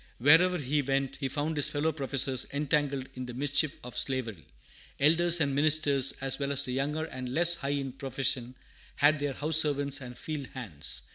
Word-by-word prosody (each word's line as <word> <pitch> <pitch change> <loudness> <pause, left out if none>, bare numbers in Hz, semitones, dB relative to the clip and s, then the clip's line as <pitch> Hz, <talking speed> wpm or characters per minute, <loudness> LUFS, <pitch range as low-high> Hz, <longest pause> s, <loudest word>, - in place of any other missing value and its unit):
Wherever 165 +8 +5
he 145 -1 -1
went, 135 0 -2
he 135 - -2
found 150 +4 -2
his 145 - +2
fellow 150 +2 0
professors 135 -3 0
entangled 140 -2 -1
in 130 -1 -7
the 125 - -8
mischief 145 +2 0
of 125 0 -9
slavery. 115 - -2 0.5
Elders 170 +4 +4
and 140 -3 +1
ministers, 145 -2 +4
as 135 0 +1
well 140 0 -2
as 140 0 -1
the 125 - -3
younger 150 +4 -2
and 130 -5 -7
less 170 +6 +3
high 140 -5 -4
in 140 -2 -2
profession, 130 -1 -3 0.4
had 150 +1 +3
their 145 -1 -2
house 155 +3 +2
servants 145 -2 +1
and 125 -1 -9
field 150 -4 -5
hands. 100 - -4
140 Hz, 185 wpm, -29 LUFS, 130-150 Hz, 0.5 s, Wherever